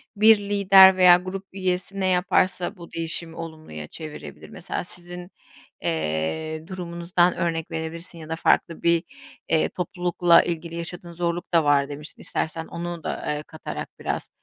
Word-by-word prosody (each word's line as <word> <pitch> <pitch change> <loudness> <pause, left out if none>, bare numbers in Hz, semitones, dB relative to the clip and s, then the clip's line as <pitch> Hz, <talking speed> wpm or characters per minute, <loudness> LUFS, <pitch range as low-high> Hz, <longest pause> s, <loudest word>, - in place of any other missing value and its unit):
Bir 215 +1 +7
lider 195 -2 +6
veya 180 -1 +8
grup 185 +2 -6
üyesi 185 +1 -2
ne 190 - +1
yaparsa 185 +1 +1
bu 170 -1 -12
değişimi 165 0 -4
olumluya 155 - -8
çevirebilir? 150 - -9
Mesela - - -5
sizin, 175 +1 -9 0.5
eee, 80 - -2
durumunuzdan 175 -1 0
örnek 165 -2 -2
verebilirsin 165 +2 -5
ya 155 -1 -10
da 160 - -1
farklı 165 0 +1
bir, 170 0 +3 0.5
eee, 160 -1 +2
toplulukla 175 -1 +3
ilgili 170 -1 -4
yaşadığın 170 +1 -6
zorluk 175 +1 -3
da 165 -1 +5
var 145 -1 +3
demiştin 150 +1 -9
istersen 160 +1 -2
onu 170 -1 -6
da, - - -2
eee, 150 - -5
katarak 75 - -7
biraz - - -3
170 Hz, 145 wpm, -24 LUFS, 160-180 Hz, 0.5 s, veya